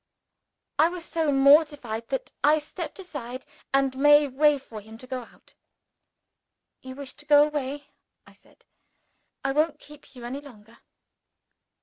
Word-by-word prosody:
I 320 +2 +6
was 350 -1 -7
so 320 -3 0
mortified 275 -5 +3
that 270 - -4
I 300 +2 +5
stepped 300 +7 -7
aside, 270 -9 -8 0.3
and 270 -1 +2
made 290 +1 +5
way 295 +1 +4
for 230 -5 -10
him 220 +2 -13
to 255 - -12
go 255 0 -5
out. - - -23 1.3
"You 260 0 -9
wish 275 -1 -8
to 295 - -14
go 290 0 +7
away," 290 -1 -4 0.4
I - - -18
said; - - -24 0.8
"I 270 - +2
won't 305 +2 +1
keep 295 -2 -16
you 240 -1 -9
any 265 +4 -5
longer." 230 -5 -16
280 Hz, 145 wpm, -26 LUFS, 255-295 Hz, 1.3 s, go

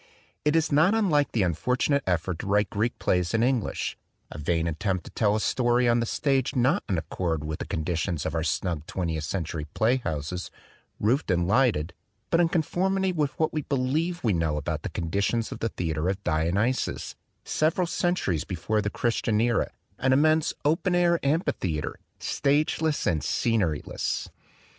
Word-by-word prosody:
It 150 +1 +2
is 160 -1 +2
not 155 +9 +4
unlike 155 - +2
the 110 - +1
unfortunate 125 - +1
effort 90 -1 0
to - - -5
write 105 0 +2
Greek 110 +4 -1
plays 90 +3 +1
in 115 - +3
Eng 125 -1 +3
lish, - - -3 0.4
a 75 - -7
vain 80 +2 0
attempt 90 +2 -1
to - - -10
tell 105 -2 +2
a - - +1
story 120 +2 +2
on 120 0 +4
the 115 - -1
stage 135 -1 0
not 135 +10 +2
in 95 - +1
accord 80 -1 -2
with 75 0 -4
the - - -5
conditions 80 0 -2
of 80 - -2
our 80 - 0
snug 80 0 -2
twentieth 80 -4 -2
century 80 -2 -3
playhouses, 90 - -1 0.5
roofed 125 +7 +1
and 90 -1 +2
lighted, 105 - +2 0.4
but 165 - +4
in 170 -1 +4
conformity 190 +4 +1
with 150 -5 -1
what 155 - +1
we 155 - 0
believe 150 +6 -1
we 110 -4 +2
know 80 -3 0
about 75 - -3
the - - -4
conditions 100 +7 -1
of - - -6
the 115 - -1
theater 80 -3 -2
of 100 +1 -3
Dionysus, 85 +10 0 0.3
several 160 +4 +1
centuries 170 - 0
before 105 +4 -1
the 105 - -1
Christian 115 -1 0
era, 115 0 +2 0.3
an 130 0 +3
immense 155 +3 +3
open 170 +4 +2
air 175 -1 +3
amphitheater, 135 - -1 0.2
stage 145 +3 +1
less 160 -2 0
and 80 -5 +1
scenery 100 -11 +1
less. - - -3
110 Hz, 175 wpm, -26 LUFS, -, 0.5 s, not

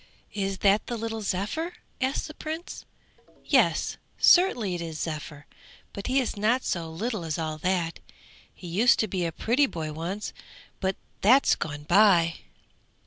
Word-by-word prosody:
'Is 195 -1 -2
that 200 +2 +4
the 240 - -3
little 225 0 -4
Zephyr?' 210 - -2 0.3
asked 260 +4 -1
the 305 - -9
Prince. 315 +3 -6 0.6
'Yes, - - +2 0.2
certainly 245 - +5
it 175 - -4
is 160 -2 -5
Zephyr, 150 -2 -5 0.5
but 200 - -6
he 260 +2 +3
is 255 - -2
not 225 +5 +1
so 165 -2 -2
little 210 +4 -3
as 160 -2 -3
all 155 -2 -3
that. 175 -1 -1 0.5
He - - -14
used 205 +8 +4
to 220 - 0
be 185 -3 -2
a 165 - -1
pretty 250 - +2
boy 155 -7 -5
once, 175 +7 -4 0.5
but 190 -1 0 0.3
that's 255 +7 +5
gone 145 -2 -5
by!' 175 -2 +4
195 Hz, 155 wpm, -27 LUFS, 165-235 Hz, 0.6 s, certainly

